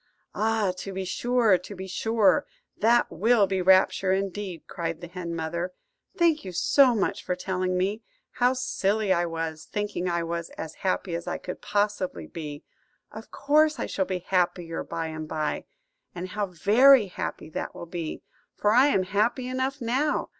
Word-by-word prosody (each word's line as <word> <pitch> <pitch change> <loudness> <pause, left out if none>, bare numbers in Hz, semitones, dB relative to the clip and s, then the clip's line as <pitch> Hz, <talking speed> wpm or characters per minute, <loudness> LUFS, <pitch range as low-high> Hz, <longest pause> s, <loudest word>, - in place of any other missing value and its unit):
"Ah, 215 -3 +1
to 195 - -6
be 190 0 -3
sure, 230 0 +2
to 200 +3 -10
be 190 0 -6
sure, 205 -1 +2 0.3
that 235 +2 +3
will 215 +4 +3
be 190 -1 -1
rapture, 190 +1 +4
indeed," 195 -2 -2
cried 165 -1 -4
the 175 - -7
hen 170 -1 -6
mother. 170 +3 -3 0.4
"Thank 335 -3 +3
you 185 - -6
so 255 +8 +4
much 200 -1 -1
for 180 - -1
telling 185 0 -1
me! 200 +4 -1 0.3
How 250 +1 +2
silly 210 -5 0
I 175 -1 +1
was, 165 -2 -4
thinking 205 -3 -3
I 170 -1 0
was 170 0 -4
as 160 -1 -6
happy 185 -1 -1
as 170 0 -4
I - - -2
could 180 - -7
possibly 205 - -1
be! 150 - -7 0.5
Of 220 +1 -10
course 305 +2 +3
I - - -2
shall 190 - -1
be 185 - -2
happier 175 -2 0
by 165 - -4
and 155 -1 -5
by; 155 -1 -2 0.5
and 180 +1 -5
how 205 +2 -2
very 215 - +6
happy 175 -4 -6
that - - -5
will - - -7
be, 170 -2 -5 0.3
for 210 - +2
I 255 +5 +6
am 195 -10 +2
happy 220 +7 0
enough 260 +2 -2
now. 260 +6 0
190 Hz, 175 wpm, -26 LUFS, 170-225 Hz, 0.5 s, very